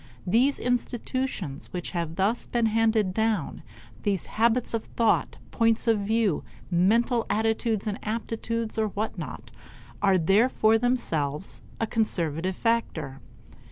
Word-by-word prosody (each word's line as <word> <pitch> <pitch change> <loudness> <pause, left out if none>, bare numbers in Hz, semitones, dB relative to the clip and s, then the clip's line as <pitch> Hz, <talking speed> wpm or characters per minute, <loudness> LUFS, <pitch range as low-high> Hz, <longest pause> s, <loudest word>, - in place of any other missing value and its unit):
These 245 +9 +3
institutions 245 - -2
which 180 -1 -4
have 170 -2 -3
thus 200 +6 0
been 235 -1 +1
handed 220 -3 +2
down, 220 -6 0 0.4
these 200 -3 -1
habits 235 +2 +1
of 230 - -2
thought, 230 -2 +1
points 230 0 +2
of 225 -2 +4
view, 210 -4 +1 0.3
mental 230 +7 +2
attitudes 220 0 0
and 210 -1 -3
aptitudes, 225 0 -3
or 220 - +2
what 210 -1 -3
not, 125 -6 -7 0.5
are 195 -2 +4
therefore 215 +5 +3
themselves 180 - -1 0.2
a 225 - +1
conservative 185 -6 -1
factor. 160 - -1
220 Hz, 120 wpm, -26 LUFS, 185-230 Hz, 0.5 s, of